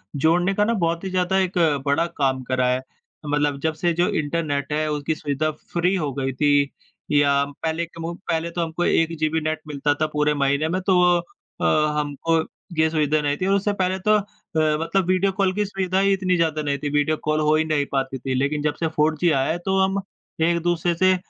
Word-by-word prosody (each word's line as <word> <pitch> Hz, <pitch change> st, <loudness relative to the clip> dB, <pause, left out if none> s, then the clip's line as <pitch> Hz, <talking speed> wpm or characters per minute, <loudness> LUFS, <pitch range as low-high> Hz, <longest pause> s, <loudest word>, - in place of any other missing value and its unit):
जोड़ने 175 Hz, +6 st, +2 dB
का 210 Hz, +1 st, +2 dB
ना 230 Hz, -, +1 dB
बहुत 170 Hz, -3 st, -1 dB
ही 190 Hz, -, -3 dB
ज़्यादा 185 Hz, +1 st, +1 dB
एक 185 Hz, -1 st, -1 dB, 0.3 s
बड़ा 140 Hz, +4 st, +2 dB
काम 130 Hz, -2 st, +1 dB
करा 130 Hz, 0 st, 0 dB
है। 125 Hz, 0 st, +1 dB
अ, 130 Hz, +3 st, -18 dB
मतलब 145 Hz, -1 st, 0 dB
जब 160 Hz, 0 st, +1 dB
से 170 Hz, +2 st, 0 dB
जो 175 Hz, +2 st, +1 dB
इंटरनेट 145 Hz, -2 st, -2 dB
है 155 Hz, 0 st, 0 dB
उसकी 150 Hz, +1 st, -1 dB
सुविधा 150 Hz, +1 st, -1 dB
फ्री 175 Hz, +4 st, -2 dB
हो 150 Hz, -6 st, -1 dB
गई 135 Hz, -1 st, -2 dB
थी 145 Hz, 0 st, +2 dB, 0.4 s
या 140 Hz, -1 st, +4 dB, 0.2 s
पहले 160 Hz, +1 st, -1 dB
के 165 Hz, 0 st, -15 dB
मू 170 Hz, +1 st, -3 dB, 0.2 s
पहले 165 Hz, +1 st, -1 dB
तो 175 Hz, -, -2 dB
हमको 165 Hz, +1 st, -2 dB
1 165 Hz, 0 st, +2 dB
जीबी 155 Hz, +1 st, +1 dB
नेट 155 Hz, 0 st, -2 dB
मिलता 145 Hz, 0 st, 0 dB
था 155 Hz, -, +3 dB
पूरे 150 Hz, 0 st, +2 dB
महीने 140 Hz, +2 st, +1 dB
में 185 Hz, +2 st, -1 dB
तो 185 Hz, 0 st, +2 dB
वो 175 Hz, 0 st, +5 dB, 0.4 s
अ, 150 Hz, 0 st, +3 dB
हमको 150 Hz, +3 st, 0 dB, 0.4 s
ये 160 Hz, 0 st, +4 dB
सुविधा 155 Hz, -1 st, +1 dB
नहीं 145 Hz, 0 st, 0 dB
थी। 185 Hz, -, -2 dB
और 195 Hz, -, +3 dB
उससे 205 Hz, +1 st, 0 dB
पहले 185 Hz, +1 st, -1 dB
तो 215 Hz, -, +6 dB
अ, 205 Hz, -, +1 dB, 0.6 s
मतलब 190 Hz, +2 st, 0 dB
वीडियो 185 Hz, +1 st, +2 dB
कॉल 190 Hz, -1 st, +1 dB
की 210 Hz, +1 st, 0 dB
सुविधा 190 Hz, -1 st, -1 dB
ही 195 Hz, 0 st, +3 dB
इतनी 185 Hz, -1 st, +1 dB
ज़्यादा 160 Hz, -3 st, +1 dB
नहीं 140 Hz, -1 st, -1 dB
थी, 145 Hz, -, -3 dB
वीडियो 150 Hz, +2 st, +1 dB
कॉल 155 Hz, 0 st, +1 dB
हो 155 Hz, 0 st, +3 dB
ही 155 Hz, -, +2 dB
नहीं 150 Hz, -2 st, 0 dB
पाती 135 Hz, -1 st, -1 dB
थी। 130 Hz, +1 st, -3 dB
लेकिन 140 Hz, +3 st, 0 dB
जब 150 Hz, -1 st, 0 dB
से -, -, +3 dB
4G 160 Hz, +2 st, +3 dB
आया 135 Hz, +1 st, +1 dB
है 170 Hz, -, -1 dB
तो 190 Hz, 0 st, +1 dB
हम 190 Hz, +1 st, +1 dB, 0.4 s
एक-दूसरे 170 Hz, +1 st, +1 dB
से 185 Hz, +2 st, +4 dB
160 Hz, 225 wpm, -23 LUFS, 145-180 Hz, 0.6 s, तो